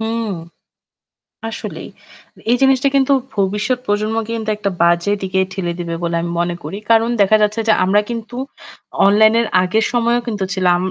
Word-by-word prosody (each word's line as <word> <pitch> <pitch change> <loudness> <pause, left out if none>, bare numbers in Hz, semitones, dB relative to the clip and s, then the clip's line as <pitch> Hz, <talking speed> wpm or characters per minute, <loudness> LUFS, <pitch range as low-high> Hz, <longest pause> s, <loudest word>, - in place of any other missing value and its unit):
হুম 225 0 -2 1.2
আসলেই। - - -7 0.6
এই - - +5
জিনিসটা 270 +1 +4
কিন্তু 275 0 +3 0.2
ভবিষ্যৎ 205 +5 0
প্রজন্মকে 215 +2 -1
কিন্তু 220 -1 -4
একটা 200 -1 -2
বাজে 170 +3 +3
দিকে 190 0 -1
ঠেলে 175 -3 -3
দিবে 170 -1 -4
বলে 170 0 -1
আমি 170 0 -3
মনে 175 0 -2
করি। 160 +7 -6
কারণ 225 +1 +4
দেখা 215 +2 +5
যাচ্ছে 210 +2 +1
যে 215 - +5
আমরা 200 +3 +3
কিন্তু 235 +1 -6 0.7
অনলাইন 215 +2 +5
এর 235 - 0 0.2
আগের 215 +5 +1
সময়েও 240 0 +2
কিন্তু 210 -4 -2
ছিলাম। 180 -2 +2
210 Hz, 160 wpm, -18 LUFS, 190-230 Hz, 1.2 s, এই